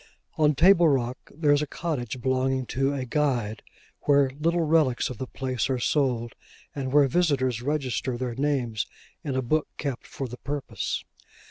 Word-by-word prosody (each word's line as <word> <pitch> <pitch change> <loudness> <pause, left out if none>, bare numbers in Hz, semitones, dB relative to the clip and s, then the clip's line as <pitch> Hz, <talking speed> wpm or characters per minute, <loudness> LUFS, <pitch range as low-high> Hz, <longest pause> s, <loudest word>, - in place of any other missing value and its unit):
On 150 -1 +3
Table 170 +2 +6
Rock, 130 -2 -1
there 150 -1 +1
is 145 0 +4
a 150 - -2
cottage 130 -8 -3
belonging 130 0 +1
to 135 +2 +1
a 135 -2 -3
Guide, 120 -6 0 0.4
where 140 -2 +4
little 165 +5 0
relics 150 -6 +2
of 125 - -8
the 130 - -4
place 130 -1 -2
are 130 - +1
sold, 120 -3 0 0.4
and 135 -2 -3
where 145 0 +5
visitors 135 -7 +1
register 130 -2 -1
their 125 -1 -3
names 125 -5 -1 0.4
in 140 -3 -2
a 130 - 0
book 155 +6 +1
kept 140 -4 -4
for 135 - -5
the 125 +1 -8
purpose. 145 -1 -3
135 Hz, 165 wpm, -26 LUFS, 125-150 Hz, 0.4 s, Table